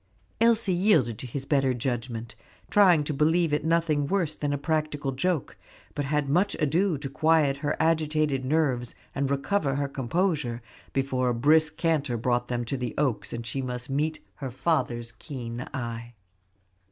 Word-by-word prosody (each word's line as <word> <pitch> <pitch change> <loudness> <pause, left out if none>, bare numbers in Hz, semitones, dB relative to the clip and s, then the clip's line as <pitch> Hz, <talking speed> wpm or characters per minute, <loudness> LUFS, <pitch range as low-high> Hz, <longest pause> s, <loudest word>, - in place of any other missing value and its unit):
Elsie 230 -4 +3
yielded 160 - +3
to 130 - -6
his 135 +3 -5
better 135 -3 +2
judgment, 120 -1 -3 0.4
trying 180 -7 +6
to 150 - -3
believe 160 +2 +2
it 150 - +1
nothing 160 -3 +1
worse 175 -4 0
than 145 -1 -2
a 145 - 0
practical 150 -1 -1
joke; 160 +2 -1 0.4
but 145 - -2
had 150 0 0
much 180 +8 +2
ado 165 +3 +1
to 140 0 -5
quiet 150 0 +2
her 145 +1 -2
agitated 155 -4 +1
nerves 130 -4 0 0.2
and 140 0 -1
recover 140 +1 0
her 140 0 0
composure 140 -2 -1 0.3
before 130 -2 0
a 120 - 0
brisk 155 +5 +3
canter 155 -7 +1
brought 120 +1 0
them 120 -1 -2
to 135 +4 -2
the 125 -2 -4
Oaks, 135 -6 0
and 115 0 -5
she 135 +4 -3
must 125 +1 -5
meet 155 +3 0 0.2
her 135 -2 -4
father's 120 -4 -1
keen 120 -1 -7
eye. 120 -1 -5
140 Hz, 165 wpm, -27 LUFS, 125-160 Hz, 0.4 s, trying